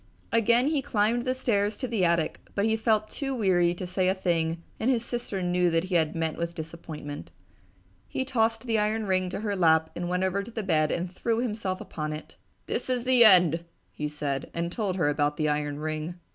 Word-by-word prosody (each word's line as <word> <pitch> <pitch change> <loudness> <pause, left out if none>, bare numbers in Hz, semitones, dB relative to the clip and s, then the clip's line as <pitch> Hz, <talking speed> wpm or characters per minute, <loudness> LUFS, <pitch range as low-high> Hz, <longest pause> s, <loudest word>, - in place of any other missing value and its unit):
Again 235 +4 +4
he 300 -3 +1
climbed 230 +1 +1
the 255 0 0
stairs 210 -4 0
to 255 - -3
the 225 -5 0
attic 170 -2 +1 0.2
but 200 - +1
he 220 0 +2
felt 220 -1 +1
too 270 +3 -3
weary 180 -6 +2
to 185 - -5
say 185 +1 0
a 190 - +1
thing 170 -3 -1 0.2
and 230 - +1
his 235 -3 +1
sister 235 -6 -3
knew 180 0 +2
that 165 0 +1
he 185 0 -5
had 160 -2 +2
met 160 -1 -2
with 170 0 -3
disappointment. 155 - -7 0.8
He 260 - -2
tossed 225 -3 +1
the 225 -3 +1
iron 215 +1 0
ring 185 -1 +1
to 190 - -4
her 205 -2 -1
lap 160 -3 +3
and 175 0 -3
went 180 +1 0
over 190 +1 0
to 200 - -9
the 225 -2 -4
bed 155 -5 +2
and 175 +1 -2
threw 225 +4 -1
himself 210 -6 -2
upon 155 -1 -5
it. 150 - -9 0.3
"This - - -3
is 250 -1 0
the 255 -2 +6
end!" 175 -6 +6 0.3
he 150 - -3
said, 145 -2 -3
and 170 +1 -2
told 200 -2 -2
her 165 -6 +1
about 145 0 +1
the 155 - +1
iron 150 -1 -1
ring. 155 +2 -4
185 Hz, 215 wpm, -27 LUFS, 165-225 Hz, 0.8 s, the